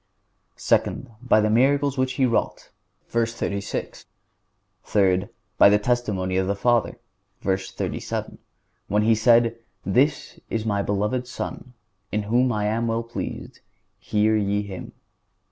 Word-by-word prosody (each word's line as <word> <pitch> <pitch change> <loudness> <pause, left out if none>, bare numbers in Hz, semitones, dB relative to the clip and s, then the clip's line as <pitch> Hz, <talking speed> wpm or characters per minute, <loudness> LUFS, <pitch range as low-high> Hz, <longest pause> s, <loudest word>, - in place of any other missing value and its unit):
Second—By 115 -2 +1
the 105 0 +1
miracles 140 +4 +3
which 130 -1 0
He 130 +1 +2
wrought 115 -2 -1 0.4
(v. 115 0 +1
36). 100 -3 -4 0.8
Third—By 95 0 +2
the 105 - +5
testimony 105 -5 -1
of 95 0 +1
the 100 - 0
Father 120 +3 +1 0.4
(v. 95 - +1
37), 95 0 -5 0.5
when 105 +2 +1
He 115 +1 +4
said: 115 +1 +3 0.3
"This 130 +10 +1
is 115 -1 -2
my 100 -2 0
beloved 105 +6 -1
Son, 125 0 -6 0.4
in 105 0 -1
whom 120 +4 +2
I 105 -2 -1
am 115 +2 0
well 115 +1 -1
pleased; 115 +1 -6 0.4
hear 110 0 +1
ye 105 -1 0
Him." 95 -3 -8
110 Hz, 130 wpm, -24 LUFS, 100-120 Hz, 0.8 s, the